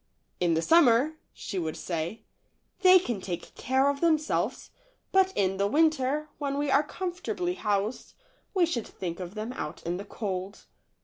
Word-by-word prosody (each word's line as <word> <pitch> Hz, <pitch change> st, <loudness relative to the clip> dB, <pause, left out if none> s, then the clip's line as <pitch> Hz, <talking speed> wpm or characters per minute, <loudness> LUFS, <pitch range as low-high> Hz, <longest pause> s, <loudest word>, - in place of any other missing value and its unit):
w 180 Hz, -, +2 dB
In 165 Hz, -, +3 dB
the 165 Hz, -, 0 dB
summer," 295 Hz, -, +5 dB, 0.2 s
she 195 Hz, -, -5 dB
would 160 Hz, -2 st, -3 dB
say, 170 Hz, +4 st, -4 dB, 0.6 s
"they 370 Hz, -1 st, +8 dB
can 240 Hz, -, -2 dB
take 175 Hz, -3 st, -6 dB
care 265 Hz, +2 st, +1 dB
of 280 Hz, 0 st, 0 dB
themselves, 315 Hz, -3 st, +1 dB, 0.4 s
but 380 Hz, 0 st, +4 dB
in 195 Hz, -1 st, +1 dB
the 200 Hz, +1 st, +2 dB
winter, 300 Hz, +1 st, +2 dB
when 280 Hz, -1 st, -2 dB
we 290 Hz, -1 st, 0 dB
are 275 Hz, -, +5 dB
comfortably 355 Hz, +2 st, -3 dB
housed, 210 Hz, -, -2 dB, 0.4 s
we 365 Hz, -2 st, +5 dB
should 245 Hz, -10 st, -3 dB
think 170 Hz, -2 st, -6 dB
of 180 Hz, +2 st, -7 dB
them 220 Hz, +3 st, -4 dB
out 150 Hz, -, -6 dB
in 175 Hz, +1 st, -2 dB
the 200 Hz, -, -7 dB
cold." 195 Hz, -1 st, -5 dB
250 Hz, 170 wpm, -28 LUFS, 190-310 Hz, 0.6 s, they